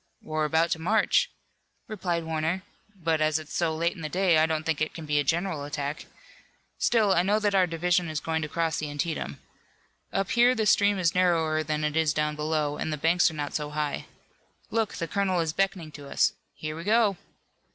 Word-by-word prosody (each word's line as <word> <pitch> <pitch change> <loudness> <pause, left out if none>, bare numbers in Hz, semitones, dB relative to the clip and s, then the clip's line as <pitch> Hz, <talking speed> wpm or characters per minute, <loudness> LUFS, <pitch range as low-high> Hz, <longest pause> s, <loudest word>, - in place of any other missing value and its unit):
"We're 155 0 -1
about 160 +2 +2
to 160 - 0
march," 220 - +2 0.6
replied 180 -6 -2
Warner, 160 +3 -1 0.3
"but 165 -4 0
as 155 0 +3
it's 155 -1 -8
so 165 -2 0
late 170 +2 0
in 170 - -10
the 155 - -4
day 180 -3 +3
I 160 - +4
don't 160 -1 -1
think 160 -2 -1
it 155 - -1
can 160 - -7
be 150 -1 +1
a - - +2
general 165 0 -1
attack. 145 +1 -4 0.7
Still, 215 -5 +3
I 175 - +4
know 200 +4 +2
that 210 -1 +1
our 185 -2 +4
division 175 +1 +1
is 155 -1 -2
going 160 0 -2
to 155 - -2
cross 165 0 -1
the 150 - -3
Antietam. 145 +3 -3 0.7
Up 195 -1 -1
here 245 +1 +5
the 220 -3 0
stream 205 -1 +4
is 170 -3 +1
narrower 165 -4 +2
than 155 0 -2
it 150 0 -1
is 160 -3 +2
down 150 0 0
below, 150 -1 -1
and 160 - -3
the 150 - -2
banks 170 +5 +3
are 160 - -9
not 145 -1 -4
so 150 -1 -2
high. 150 -1 -3 0.6
Look, 225 -2 0
the 165 - -3
colonel 190 0 0
is 160 -2 -1
beckoning 185 -4 -1
to 145 -2 -10
us! - - +2 0.2
Here 155 0 -5
we 165 - -7
go!" 210 -1 +3
160 Hz, 215 wpm, -27 LUFS, 155-185 Hz, 0.7 s, here